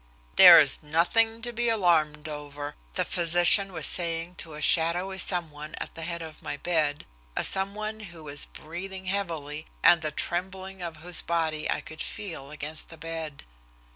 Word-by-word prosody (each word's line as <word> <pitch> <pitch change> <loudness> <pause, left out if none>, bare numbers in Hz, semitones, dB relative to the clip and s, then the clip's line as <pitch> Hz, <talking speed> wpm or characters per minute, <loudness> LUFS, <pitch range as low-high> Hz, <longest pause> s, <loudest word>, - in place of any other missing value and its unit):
"There - - +11
is - - +3
nothing 225 +9 +1
to 240 -1 -3
be 240 +1 0
alarmed 160 -8 +1
over," 145 -1 -7 0.2
the - - +1
physician 175 +3 +3
was - - +1
saying 170 -1 -1
to 160 -2 -10
a - - -8
shadowy 175 +5 +3
some 175 -3 0
one 150 +1 -9
at - - -6
the 165 - -8
head 170 0 -4
of 160 -1 -11
my 145 - -5
bed, 150 -3 -1 0.3
a - - 0
some 195 +1 0
one 215 +1 -5
who 170 -6 -11
was 145 -1 +1
breathing 185 +4 -8
heavily, 165 -6 -3 0.2
and 170 - +6
the 155 - -2
trembling 190 +4 -4
of 170 -2 -6
whose 180 0 +4
body 160 -2 -1
I - - 0
could 155 0 -10
feel 165 -10 -5
against 150 +1 -6
the 165 - -12
bed. 160 -2 -6
170 Hz, 175 wpm, -27 LUFS, 155-190 Hz, 0.3 s, There